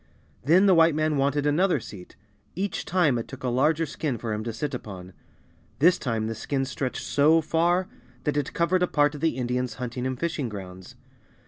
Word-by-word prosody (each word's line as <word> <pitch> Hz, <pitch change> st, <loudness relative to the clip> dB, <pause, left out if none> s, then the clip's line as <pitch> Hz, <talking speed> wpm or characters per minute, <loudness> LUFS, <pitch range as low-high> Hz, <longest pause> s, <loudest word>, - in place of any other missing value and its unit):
Then 170 Hz, +9 st, +5 dB
the 195 Hz, -, +6 dB
White 165 Hz, -2 st, +5 dB
man 155 Hz, -1 st, +1 dB
wanted 140 Hz, +1 st, +1 dB
another 160 Hz, +2 st, +2 dB
seat. 95 Hz, -5 st, -11 dB, 0.4 s
Each 195 Hz, 0 st, -3 dB
time 160 Hz, -9 st, +2 dB
it 115 Hz, -, -6 dB
took 135 Hz, -, -10 dB
a 125 Hz, -, 0 dB
larger 150 Hz, +6 st, +2 dB
skin 145 Hz, -3 st, -3 dB
for 115 Hz, -1 st, -4 dB
him 105 Hz, 0 st, -3 dB
to 115 Hz, -, -2 dB
sit 135 Hz, +6 st, -4 dB
upon. 95 Hz, -6 st, -8 dB, 0.6 s
This 175 Hz, +5 st, +4 dB
time 115 Hz, -4 st, -2 dB
the 115 Hz, -, -2 dB
skin 135 Hz, +5 st, -2 dB
stretched 130 Hz, 0 st, -4 dB
so 155 Hz, +3 st, +4 dB
far 170 Hz, +4 st, +1 dB, 0.4 s
that 150 Hz, -, -1 dB
it 145 Hz, -1 st, -1 dB
covered 175 Hz, +2 st, +1 dB
a 180 Hz, -, +3 dB
part 145 Hz, -1 st, +2 dB
of 145 Hz, -, -8 dB
the 160 Hz, -6 st, +1 dB
Indians' 125 Hz, -2 st, -2 dB
hunting 125 Hz, +2 st, -4 dB
and 130 Hz, -1 st, -4 dB
fishing 160 Hz, -7 st, -2 dB
grounds. 95 Hz, -3 st, -9 dB
140 Hz, 200 wpm, -26 LUFS, 120-165 Hz, 0.6 s, the